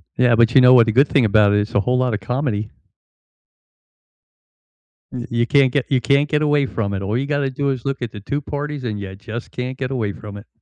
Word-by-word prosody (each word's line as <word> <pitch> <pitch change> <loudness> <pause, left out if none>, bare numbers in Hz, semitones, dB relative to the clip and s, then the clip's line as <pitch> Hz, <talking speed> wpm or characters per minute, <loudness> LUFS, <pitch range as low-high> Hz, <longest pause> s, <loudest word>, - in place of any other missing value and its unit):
Yeah, 125 -2 +3
but, 115 +2 +2
you 130 - +8
know 125 0 +7
what, 120 -3 +6
the 110 - 0
good 135 +5 +4
thing 135 -5 +3
about 105 -1 +4
it 105 - +3
it's 105 - -4
a - - +4
whole 125 +4 0
lot 125 -3 0
of 105 - -2
comedy. 110 -1 -3 2.4
Y 125 -2 -5
you 120 0 0
can't 140 -3 +3
get 140 -2 0
you 130 -3 +1
can't 140 +1 +2
get 150 0 0
away 145 -2 +2
from 105 -6 -3
it. 95 - -3
All 105 +4 -2
you 135 - -2
gotta 145 -2 -1
do 140 +1 -2
is 130 -2 -4
look 135 -2 -3
at 120 - -4
the 105 - -9
2 140 +8 -4
parties 145 -1 -5
and 105 -4 -4
you 95 -1 -7
just 115 +3 -8
can't 125 +1 -5
get 130 -1 -3
away 115 -6 -2
from 105 0 -10
it. 100 - -13
125 Hz, 250 wpm, -19 LUFS, 110-140 Hz, 2.4 s, you